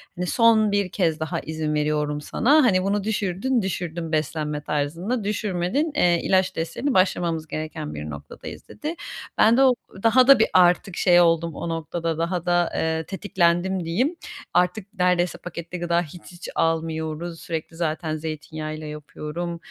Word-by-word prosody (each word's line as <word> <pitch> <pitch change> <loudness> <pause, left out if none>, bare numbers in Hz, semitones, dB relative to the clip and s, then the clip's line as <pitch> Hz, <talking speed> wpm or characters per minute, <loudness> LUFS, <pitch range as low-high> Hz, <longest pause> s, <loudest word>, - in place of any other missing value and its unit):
hani, 180 +1 -3
"Son 220 0 +4
1 200 -2 +1
kez 165 -5 0
daha 160 -1 -2
izin 155 -1 -3
veriyorum 150 0 0
sana, 290 - +3
hani, 185 -7 +3
bunu 200 +1 0
düşürdün 215 +4 0
düşürdün 170 -3 -4
beslenme 150 -1 -1
tarzında, 165 - -2
düşürmedin, 205 - -1
eee, 175 -1 +3
ilaç 190 -1 +2
desteğine 240 - -2
başlamamız 170 -4 +1
gereken 155 - -5
bir 75 +1 -6
noktadayız." 70 -1 -9
Dedi. 310 +3 -5 0.4
Ben 225 +3 +5
de 270 - +6
o 260 -2 +6 0.3
daha 250 +3 +5
da 275 -3 +8
bir 220 - +4
artık 180 0 +4
şey 175 -1 +5
oldum, 165 -2 +2
o 170 - -4
noktada 165 0 -3
daha 170 +1 -2
da, 175 -1 +2
eee, 160 0 0
tetiklendim 185 -1 0
diyeyim. 250 - 0 0.4
Artık 180 +4 +1
neredeyse 180 -1 +2
paketli 170 0 -7
gıda 170 0 +1
hiç 175 +1 -10
hiç 175 0 -9
almıyoruz. 165 0 -1
Sürekli 165 0 -5
zaten 160 -1 -2
zeytinyağıyla 155 0 -6
yapıyorum, 150 +3 -6
175 Hz, 150 wpm, -24 LUFS, 160-190 Hz, 0.4 s, da